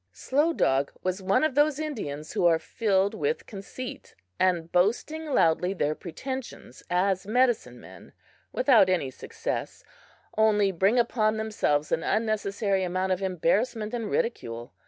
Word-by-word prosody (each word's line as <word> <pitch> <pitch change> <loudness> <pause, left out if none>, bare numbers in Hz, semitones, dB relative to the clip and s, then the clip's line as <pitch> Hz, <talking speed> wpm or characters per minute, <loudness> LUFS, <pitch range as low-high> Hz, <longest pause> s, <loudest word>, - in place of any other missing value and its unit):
Slow 290 - +1
Dog 135 - +1
was 185 +1 -2
one 190 +9 +2
of 310 -3 +1
those 295 +1 +3
Indians 205 - -5
who 175 - +3
are 165 -1 +4
filled 200 +1 0
with 465 +1 -2
conceit, 220 +5 -8 0.2
and 175 -3 +1
boasting 240 - 0
loudly 180 - +2
their 150 -4 0
pretensions 235 - -7
as 190 +2 +1
medicine 245 +1 +1
men, - - -14 0.4
without 245 -8 +4
any 170 -8 0
success, - - -5 0.5
only 210 -2 +3
bring 195 +6 +2
upon 220 -2 +2
themselves 180 -9 0
an 160 - +1
unnecessary 205 -2 0
amount 185 +1 -1
of 185 +1 0
embarrassment 205 +5 0
and 230 -3 -3
ridicule. 120 - -3
200 Hz, 135 wpm, -27 LUFS, 180-240 Hz, 0.5 s, are